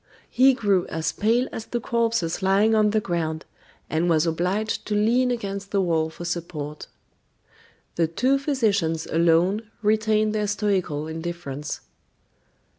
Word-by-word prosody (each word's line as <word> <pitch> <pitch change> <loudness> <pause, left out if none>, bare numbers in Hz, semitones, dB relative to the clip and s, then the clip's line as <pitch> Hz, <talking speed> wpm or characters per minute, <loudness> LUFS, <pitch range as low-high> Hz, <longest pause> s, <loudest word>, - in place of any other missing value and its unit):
He 265 +1 +5
grew 200 -6 +1
as 160 0 -2
pale 230 +7 +1
as 225 - -7
the 240 - -2
corpses 230 -7 0
lying 195 +3 +3
on 215 -1 +4
the 215 +1 +2
ground, 165 -5 -3 0.4
and 165 +2 0
was 160 -1 +3
obliged 180 +6 -1
to 210 - -1
lean 235 +5 +3
against 200 -4 -4
the 200 - 0
wall 165 -4 +1
for 175 +2 -9
support. 160 -4 -5 1.1
The 165 -1 +3
two 255 +12 +1
physicians 210 - 0
alone 170 +6 +2
retained 215 0 +2
their 210 -1 0
stoical 195 -7 -1
indifference. 160 -3 -5
195 Hz, 135 wpm, -24 LUFS, 165-220 Hz, 1.1 s, He